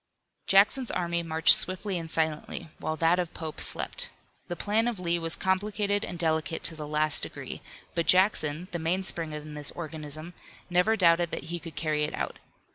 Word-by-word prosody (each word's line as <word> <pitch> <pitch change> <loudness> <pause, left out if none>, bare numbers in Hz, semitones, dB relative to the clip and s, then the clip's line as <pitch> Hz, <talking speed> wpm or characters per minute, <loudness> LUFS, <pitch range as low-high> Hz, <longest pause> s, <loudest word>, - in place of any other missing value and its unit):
Jackson's 215 +6 +4
army 170 -1 -1
marched 160 -1 +7
swiftly 185 0 +4
and 165 -1 -7
silently, 160 0 -2
while 155 - -2
that 165 +3 +3
of 175 -2 -3
Pope 160 -2 -6
slept. - - -2 0.4
The 175 - -4
plan 215 +6 0
of 235 -5 -3
Lee 170 -1 0
was 165 0 +2
complicated 205 +2 0
and 175 - -5
delicate 160 -1 -1
to 165 - -2
the 150 -1 -7
last 150 0 +2
degree, - - -6 0.3
but 170 - -1
Jackson, 180 -4 +3
the 175 - -3
mainspring 165 -1 -1
in 150 0 -7
this 150 -1 -4
organism, 155 0 -6 0.4
never 180 +5 +3
doubted 170 -3 +3
that - - -4
he 175 - -2
could 165 -3 -9
carry 150 -1 -1
it 150 - -2
out. - - -4
170 Hz, 180 wpm, -28 LUFS, 155-185 Hz, 0.4 s, marched